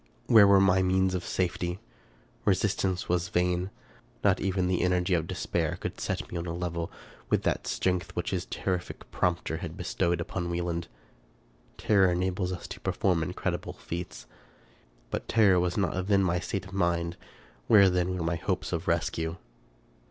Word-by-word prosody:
Where 110 -4 +7
were 100 0 +7
my 95 -1 +4
means 95 0 +2
of 90 -1 -2
safety? 90 -1 -1 0.7
Resistance 95 -2 +1
was 90 0 0
vain. 90 +1 +1 0.5
Not 95 -2 +4
even 95 -1 0
the 90 -1 +1
energy 90 0 +2
of 80 -2 +1
de - - -4
spair - - -1
could - - -5
set - - -2
me 85 - -3
on 85 - -5
a 85 - -3
level 85 -1 -3 0.4
with - - +2
that - - -1
strength 90 -1 -1
which 90 - -2
his 95 -1 -2
terrific 90 -2 -4
prompter 85 -2 0
had 85 0 -6
bestowed 85 -1 0
upon 85 -2 -3
Wieland. 85 -1 -2 0.9
Terror 95 -4 +4
enables 90 +1 -1
us 90 - -6
to - - -7
perform 90 -4 +1
incredible 80 - -3
feats; 85 -8 -6 0.9
but - - -3
terror 100 -5 +5
was 90 +2 0
not 95 -1 0
then 100 -2 +4
the 90 0 +1
state 95 +1 -3
of 95 - -12
my 85 -3 +2
mind: 85 0 -4 0.5
where 100 -2 +7
then 90 0 +1
were 85 - -2
my 85 +1 0
hopes - - -2
of 85 +1 -2
rescue 80 0 -1
90 Hz, 170 wpm, -28 LUFS, 85-95 Hz, 0.9 s, Where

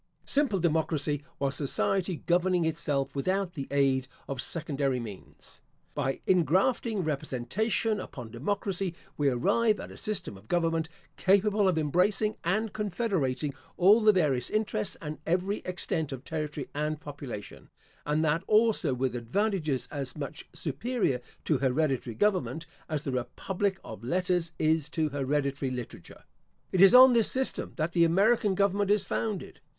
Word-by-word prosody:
Simple 275 -8 +2
democracy 155 -3 0 0.2
was 140 -1 0
society 175 +5 -1
governing 180 0 +2
itself 145 -4 -1
without 185 +5 0
the 140 -3 -5
aid 135 -2 +2 0.2
of 135 -2 -3
secondary 140 -5 -1
means. 105 -5 -10 0.3
By 135 -2 -2
ingrafting 190 - +2
representation 190 - -1
upon 125 -10 -8
democracy, 190 - -2 0.2
we 145 -1 +2
arrive 210 - +2
at - - -8
a - - -11
system 210 - -3
of 100 +3 -18
government 165 -1 0 0.3
capable 200 +1 +3
of 180 -3 +2
embracing 185 +8 +2
and 210 +5 0
confederating 175 - -1 0.2
all 200 +6 +6
the 215 0 +7
various 150 - +1
interests 215 - -1
and 150 0 -5
every 185 +5 +1
extent 165 -4 -2
of 130 -1 -6
territory 150 -2 -4
and 150 +1 -2
population; 140 -8 -8 0.3
and 150 +2 +1
that 155 +2 +2
also 215 - +3
with 125 -1 -1
advantages 150 - -1
as 140 0 -5
much 145 0 -6
superior 155 - -1 0.2
to 150 -5 +2
hereditary 135 -3 0
government, 185 -5 0 0.2
as 155 -2 -2
the 135 - -2
republic 190 +10 -2
of 110 0 -9
letters 175 +3 0
is 155 -1 +1
to 155 0 0
hereditary 140 -1 -1
literature. 125 -9 -8 0.5
It 185 - +2
is 195 +5 +8
on 255 0 +10
this 230 -2 +3
system 265 0 -1
that 160 0 -1
the 170 -1 +4
American 200 +4 +3
government 200 +1 +1
is 205 -1 +3
founded. 210 -5 -3
160 Hz, 145 wpm, -29 LUFS, 140-195 Hz, 0.5 s, on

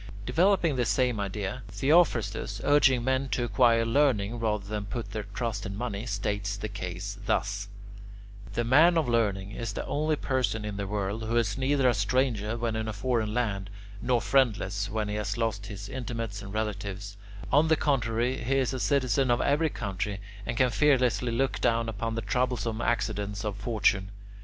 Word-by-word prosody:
Developing 170 - +3
the 120 - +2
same 125 -2 +1
idea, 100 +4 -3
Theophrastus, 135 - +2
urging 135 -4 +4
men 130 +1 0
to 125 - 0
acquire 115 0 +3
learning 115 -3 +2
rather 105 -3 -1
than 105 0 -3
to - - -11
put 120 0 -4
their 105 -2 -4
trust 115 -4 -2
in 100 -2 -5
money, 115 -1 -4
states 100 -1 -2
the 110 - -4
case 95 0 -5
thus: 100 -1 0 0.9
"The 120 - +1
man 155 +9 +5
of 160 - +1
learning 100 -5 0
is 110 -1 -4
the - - -4
only 155 +1 0
person 130 -6 -1
in 105 -1 -4
the 100 -1 -3
world 100 +1 -2
who 115 +2 0
is 110 -3 +1
neither 135 0 +2
a 125 - +4
stranger 110 0 0
when 115 -1 -1
in 110 0 -2
a 110 - -3
foreign 110 +1 0
land, 100 -5 -1 0.3
nor 120 0 +2
friendless 105 -6 +1
when 110 0 -2
he 105 - -3
has 105 0 -2
lost 110 -3 -1
his 100 0 -7
intimates 115 -5 -4
and 100 -1 -8
relatives; 100 -1 -4 0.4
on 150 +3 +5
the 160 - +4
contrary, 125 -3 0
he 135 +4 +1
is 135 -1 +1
a 130 - -3
citizen 130 -2 +2
of 120 +1 +3
every 150 +4 +2
country, 100 -4 -3 0.3
and 115 - -2
can 125 -1 +3
fearlessly 125 -4 +2
look 130 +3 0
down 115 0 +2
upon 115 +1 -3
the 115 - -3
troublesome 120 -1 -1
accidents 105 -3 -1
of 105 -2 -2
fortune. 100 -2 +1
115 Hz, 180 wpm, -28 LUFS, 105-130 Hz, 0.9 s, man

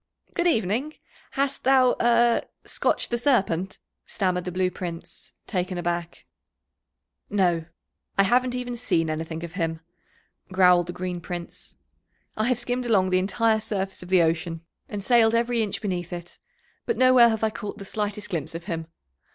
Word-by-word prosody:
"Good 345 0 +1
evening, 240 - 0 0.4
hast 275 0 -1
thou 260 -1 +5
er 235 0 +4 0.2
scotched - - -1
the 240 - +1
Serpent?" 195 - +1 0.3
stammered 180 -3 -1
the 180 - -3
Blue 185 +1 0
Prince, 170 -2 -8
taken 185 -1 -2
aback. 175 -1 -3 1.0
"No, 175 -5 +1 0.5
I 195 - +6
haven't 250 +4 +2
even 245 -1 -3
seen 170 -9 0
anything 160 +1 -4
of 170 -1 -7
him," 165 -3 -2 0.7
growled 180 -2 +5
the - - -3
Green 180 -1 -4
Prince. 175 0 -8 0.6
"I 215 - 0
have 255 -2 +2
skimmed 245 +1 -2
along 190 -5 +3
the 185 - +4
entire 220 +4 +2
surface 195 -3 -3
of 180 - -10
the 185 -2 +5
ocean, 165 0 -1 0.3
and 205 -1 -5
sailed 230 0 +4
every 235 0 +1
inch 215 0 -3
beneath 180 -4 -3
it, 175 -1 -8 0.5
but 460 - 0
nowhere 255 -2 +7
have 220 -1 -2
I 220 - +2
caught 205 -1 -6
the 200 - -8
slightest 210 0 -3
glimpse 165 -2 -3
of 165 - -5
him. 165 -1 -4
195 Hz, 160 wpm, -25 LUFS, 175-235 Hz, 1.0 s, nowhere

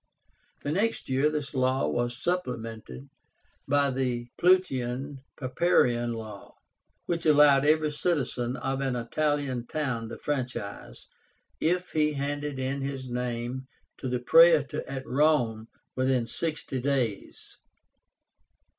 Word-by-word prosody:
The 145 - -2
next 215 +7 0
year 135 +3 +3
this 150 -2 -4
law 130 0 +1
was 120 0 -1
supplemented 115 - -4 0.6
by 140 0 +3
the 125 -2 -2
PLAUTIAN 140 -7 +1 0.2
PAPIRIAN 125 -4 +2
LAW, 110 -3 -9 0.5
which 170 -1 -1
allowed 145 -2 +6
every 155 0 +3
citizen 135 -6 -1
of 135 0 -2
an 135 -2 -1
Italian 130 0 -1
town 130 -7 -2
the 115 - -7
franchise, 130 -8 -5 0.5
if 180 +3 0
he 150 -1 +2
handed 145 0 -3
in 135 +1 -2
his 135 -1 -4
name 125 +1 -3 0.3
to 130 - -4
the 125 - 0
Praetor 160 +3 +5
at 135 -1 -5
Rome 125 -6 +2 0.3
within 130 -2 +1
sixty 150 0 -3
days. 125 -6 -2
135 Hz, 115 wpm, -28 LUFS, 120-150 Hz, 0.6 s, allowed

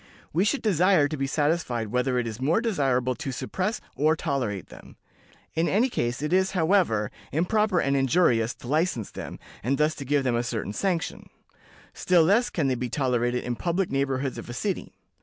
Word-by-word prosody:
We 180 +6 +2
should 270 +6 0
desire 180 -6 +4
to 155 - -4
be 135 -2 -2
satisfied 145 -7 0
whether 125 +2 0
it 120 - 0
is 115 +1 -6
more 155 +10 +2
desirable 135 - +1
to 135 - -5
suppress 190 - -2 0.2
or 155 +2 +3
tolerate 130 - -2
them. - - -14 0.6
In 165 +1 +1
any 230 +7 +2
case, 120 - -2
it 150 +3 -1
is, 190 +1 +2
however, 160 - +2 0.2
improper 185 +4 +2
and 140 -2 +1
injurious 130 -4 +2
to - - -12
license 150 - 0
them, - - -7 0.2
and 135 +5 0
thus 150 +1 +2
to 140 - -7
give 140 +1 +1
them 125 -2 +1
a 120 - +1
certain 115 -4 -3
sanction; 180 - -2 0.6
still 180 -2 +3
less 205 +9 +3
can 155 -5 0
they 130 - +2
be 125 0 -3
tolerated 125 -3 0
in 120 - -2
public 175 +6 -1
neighborhoods 135 -1 -1
of - - -9
a - - -5
city. 185 - -3
145 Hz, 190 wpm, -26 LUFS, 125-180 Hz, 0.6 s, desire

